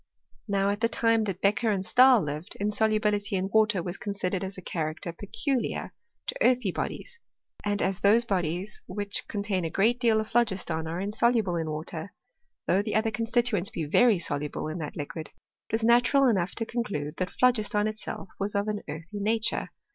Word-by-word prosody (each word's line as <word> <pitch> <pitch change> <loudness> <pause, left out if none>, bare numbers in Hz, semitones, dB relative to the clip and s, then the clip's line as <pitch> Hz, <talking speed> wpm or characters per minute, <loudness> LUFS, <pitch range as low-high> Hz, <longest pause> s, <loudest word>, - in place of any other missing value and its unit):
Now, 200 -1 +1
at 205 +1 -4
the 230 - +3
time 230 -1 +2
that 195 -2 -4
Beccher 210 +3 +2
and 190 -2 -1
Stahl 255 -2 +6
lived, 150 +4 -5
inso 210 +2 +1
lubility 210 -1 0
in 190 +1 -1
water 215 -4 +3
was 175 +2 -4
considered 195 -2 -2
as 190 +1 -5
a - - -7
character 160 +1 -3
pecu 250 - -2
liar - - -4 0.3
to - - -3
earthy 250 - +3
bodies; 470 - -5 0.4
and 205 0 0
as 190 0 0
those 215 +4 +4
bodies 185 0 -2
which 205 -1 -2
con 205 -2 -3
tain 195 -3 -1
a 165 - -1
great 225 +8 +2
deal 230 -3 +3
of 215 - -2
phlogiston 190 -9 0
are 165 +2 -3
insoluble 210 -1 +1
in 165 -2 -2
water, 155 +4 -5 0.5
though 190 - +3
the 210 0 -3
other 220 +1 +2
constituents 230 -3 0
be 170 -8 -4
very 225 +8 +4
soluble 150 -3 -2
in 160 +3 -5
that 150 -2 -6
liquid, 155 +2 -5 0.4
it - - -12
was 225 0 0
natural 245 +4 +5
enough 195 -8 +1
to 225 - -2
conclude 195 -12 -3
that 185 -1 -1
phlo - - -9
r 250 - +8
giston 210 -2 0
itself 215 -2 -5
was 200 +1 -1
of 200 +1 0
an 210 -1 -2
earthy 165 +7 -6
nature. 220 +2 0
205 Hz, 195 wpm, -27 LUFS, 180-225 Hz, 0.5 s, r